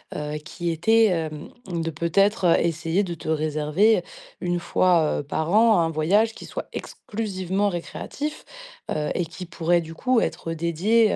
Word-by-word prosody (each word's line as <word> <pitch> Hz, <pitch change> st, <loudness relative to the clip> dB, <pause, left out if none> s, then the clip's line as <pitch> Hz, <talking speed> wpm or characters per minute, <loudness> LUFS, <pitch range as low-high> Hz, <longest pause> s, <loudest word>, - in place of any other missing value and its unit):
heu, 150 Hz, 0 st, -3 dB
qui 175 Hz, +2 st, -4 dB
était, 220 Hz, +8 st, +4 dB
hem, 160 Hz, -5 st, -3 dB, 0.2 s
de, 165 Hz, -3 st, -2 dB
peut-être, 190 Hz, +6 st, +2 dB
heu, 170 Hz, -, +5 dB
essayer 165 Hz, +3 st, 0 dB
de 175 Hz, -3 st, -4 dB
te 165 Hz, -, -10 dB
réserver, 155 Hz, +7 st, +2 dB, 0.4 s
1 175 Hz, 0 st, 0 dB
fois, 175 Hz, -3 st, +2 dB
heu, -, -, -4 dB
par 155 Hz, +3 st, -2 dB
an, 220 Hz, 0 st, +5 dB
1 165 Hz, -1 st, +2 dB
voyage 190 Hz, +8 st, +2 dB
qui -, -, -10 dB
soit -, -, -6 dB
exclusivement 200 Hz, -2 st, -2 dB
récréatif, 275 Hz, -, -5 dB, 0.5 s
heu 150 Hz, -1 st, -1 dB
et 175 Hz, -, 0 dB
qui 180 Hz, +3 st, -8 dB
pourrait, 170 Hz, 0 st, +1 dB
du 165 Hz, 0 st, -8 dB
coup, 255 Hz, +6 st, +2 dB
être 165 Hz, -6 st, -2 dB
dédié, 180 Hz, +8 st, +2 dB
175 Hz, 160 wpm, -24 LUFS, 160-205 Hz, 0.5 s, heu